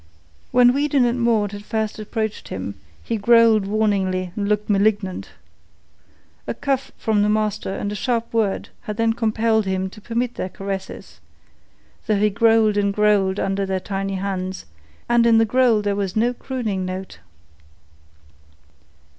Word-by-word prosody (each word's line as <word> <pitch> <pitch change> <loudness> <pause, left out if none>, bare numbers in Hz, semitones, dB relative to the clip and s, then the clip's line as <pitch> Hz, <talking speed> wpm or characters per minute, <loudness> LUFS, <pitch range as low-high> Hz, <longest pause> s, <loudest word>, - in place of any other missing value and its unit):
When 245 -1 +5
Weedon 280 -2 +2
and 240 +1 0
Maud 220 -4 +2
had 205 0 -8
first 220 -1 -3
approached 215 0 -4
him, - - -5 0.3
he 230 - -2
growled 225 -1 +4
warningly 195 -4 0
and 200 -1 -2
looked 210 0 0
malignant. 200 -2 0 1.2
A - - -3
cuff 275 -2 -2
from 215 -3 +1
the 210 - +2
master 215 -1 -1
and 205 - -3
a - - -4
sharp 230 +2 -2
word 215 -4 0 0.2
had 210 -2 -5
then 230 0 +2
compelled 220 -2 +1
him 190 0 -1
to 210 - -13
permit 235 +2 -2
their 185 - -4
caresses, 195 0 -7 0.9
though 215 -2 +2
he 210 +1 +2
growled 225 0 +3
and 200 -1 +2
growled 205 -2 +2
under 195 +1 -1
their 190 -1 -1
tiny 195 0 -3
hands, 190 -1 -4 0.4
and 240 0 +4
in 230 -1 +5
the 225 - +4
growl 235 -2 +3
there 205 -1 0
was 195 -2 -3
no 235 +3 +2
crooning 235 -7 -3
note. 185 +1 -6
210 Hz, 155 wpm, -21 LUFS, 195-230 Hz, 1.2 s, When